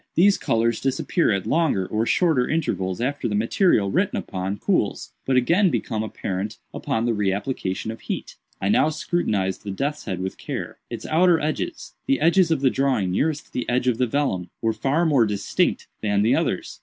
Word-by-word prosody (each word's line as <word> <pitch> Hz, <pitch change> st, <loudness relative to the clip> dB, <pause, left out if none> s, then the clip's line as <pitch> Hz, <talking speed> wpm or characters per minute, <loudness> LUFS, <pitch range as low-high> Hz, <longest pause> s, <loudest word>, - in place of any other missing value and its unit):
These 200 Hz, +4 st, +5 dB
colors 115 Hz, 0 st, +1 dB
disappear 135 Hz, +5 st, +1 dB
at 100 Hz, -2 st, -1 dB
longer 155 Hz, -, +1 dB
or 110 Hz, +4 st, -1 dB
shorter 160 Hz, -9 st, +2 dB
intervals 95 Hz, -, -1 dB
after 140 Hz, +4 st, -1 dB
the 105 Hz, -, -1 dB
material 110 Hz, -, +2 dB
written -, -, +1 dB
upon 95 Hz, +2 st, -3 dB
cools, -, -, -1 dB, 0.2 s
but 130 Hz, -, +2 dB
again 175 Hz, +10 st, +4 dB
become 110 Hz, -8 st, -2 dB
apparent 105 Hz, 0 st, -4 dB, 0.2 s
upon 115 Hz, +1 st, -1 dB
the 120 Hz, -, +1 dB
re 105 Hz, -3 st, +1 dB
application 100 Hz, -1 st, -3 dB
of 115 Hz, -, -9 dB
heat. -, -, -5 dB, 0.2 s
"I 100 Hz, -, -1 dB
now 150 Hz, -, +4 dB
scrutinized 110 Hz, -, -1 dB
the 105 Hz, -, -6 dB
death's 140 Hz, +10 st, -3 dB
head 95 Hz, -4 st, -3 dB
with 95 Hz, +1 st, -4 dB
care. -, -, -5 dB
Its -, -, -6 dB
outer 170 Hz, +1 st, +4 dB
edges—the 275 Hz, -, -3 dB
edges 170 Hz, +1 st, +4 dB
of 160 Hz, -4 st, +1 dB
the 130 Hz, -2 st, +3 dB
drawing 130 Hz, -9 st, +1 dB
nearest 150 Hz, -, -1 dB
the 125 Hz, -, -3 dB
edge 125 Hz, +1 st, +1 dB
of 120 Hz, -2 st, +1 dB
the 125 Hz, -, +2 dB
vellum—were 115 Hz, -5 st, -1 dB
far 145 Hz, +9 st, +1 dB
more 135 Hz, -8 st, +4 dB
distinct 100 Hz, -1 st, 0 dB, 0.2 s
than 100 Hz, -1 st, +1 dB
the 115 Hz, -, +3 dB
others. -, -, -2 dB
120 Hz, 180 wpm, -23 LUFS, 100-155 Hz, 0.2 s, These